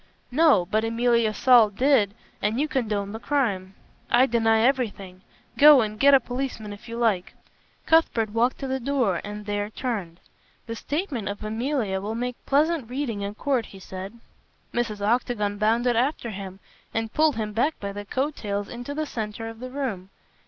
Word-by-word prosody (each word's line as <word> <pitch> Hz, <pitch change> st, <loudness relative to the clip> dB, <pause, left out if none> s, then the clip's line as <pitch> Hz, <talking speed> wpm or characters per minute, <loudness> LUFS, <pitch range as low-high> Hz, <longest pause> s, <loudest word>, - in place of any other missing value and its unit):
"No, 275 Hz, -, +4 dB
but 215 Hz, +4 st, 0 dB
Emilia 230 Hz, 0 st, +2 dB
Saul 235 Hz, -1 st, +5 dB
did, 215 Hz, -2 st, +2 dB, 0.3 s
and 215 Hz, +4 st, 0 dB
you 300 Hz, -, +1 dB
condoned 210 Hz, -7 st, -2 dB
the 220 Hz, -, -5 dB
crime." 205 Hz, -10 st, -1 dB, 0.3 s
"I 245 Hz, +2 st, +5 dB
deny 225 Hz, -2 st, +2 dB
everything! 215 Hz, -8 st, -1 dB, 0.4 s
Go 295 Hz, -2 st, +9 dB
and 215 Hz, -1 st, -3 dB
get 280 Hz, 0 st, +7 dB
a -, -, +6 dB
policeman 245 Hz, -4 st, -5 dB
if 220 Hz, +4 st, -13 dB
you 230 Hz, -, -5 dB
like." 215 Hz, -6 st, 0 dB, 0.5 s
Cuthbert 240 Hz, -10 st, +3 dB
walked 235 Hz, +3 st, +1 dB
to 270 Hz, -, -3 dB
the 265 Hz, 0 st, -1 dB
door 250 Hz, -8 st, 0 dB
and 210 Hz, 0 st, -7 dB
there 205 Hz, 0 st, -2 dB
turned. 205 Hz, -8 st, -4 dB, 0.5 s
"The 230 Hz, -, -5 dB
statement 285 Hz, -, -3 dB
of 205 Hz, +1 st, -6 dB
Emilia 220 Hz, -3 st, -1 dB
will 215 Hz, +3 st, -4 dB
make 245 Hz, +1 st, -4 dB
pleasant 295 Hz, -2 st, +2 dB
reading 250 Hz, -5 st, -3 dB
in 200 Hz, +1 st, -4 dB
court," 260 Hz, -2 st, 0 dB
he 195 Hz, -, -13 dB
said. 190 Hz, +3 st, -8 dB, 0.6 s
Mrs. 215 Hz, -4 st, -2 dB
Octagon 210 Hz, -3 st, 0 dB
bounded 230 Hz, +3 st, +2 dB
after 245 Hz, -1 st, 0 dB
him 190 Hz, -1 st, -8 dB, 0.4 s
and 225 Hz, 0 st, -2 dB
pulled 310 Hz, -1 st, +3 dB
him 215 Hz, -1 st, -3 dB
back 280 Hz, +8 st, 0 dB
by 200 Hz, -1 st, -4 dB
the 205 Hz, +1 st, -6 dB
coat 270 Hz, +8 st, -2 dB
tails 205 Hz, -1 st, -3 dB
into 245 Hz, +4 st, -6 dB
the 310 Hz, +1 st, -1 dB
centre 225 Hz, -3 st, -5 dB
of 225 Hz, 0 st, -11 dB
the 255 Hz, +1 st, -6 dB
room. 245 Hz, -9 st, -4 dB
230 Hz, 175 wpm, -25 LUFS, 205-260 Hz, 0.6 s, Go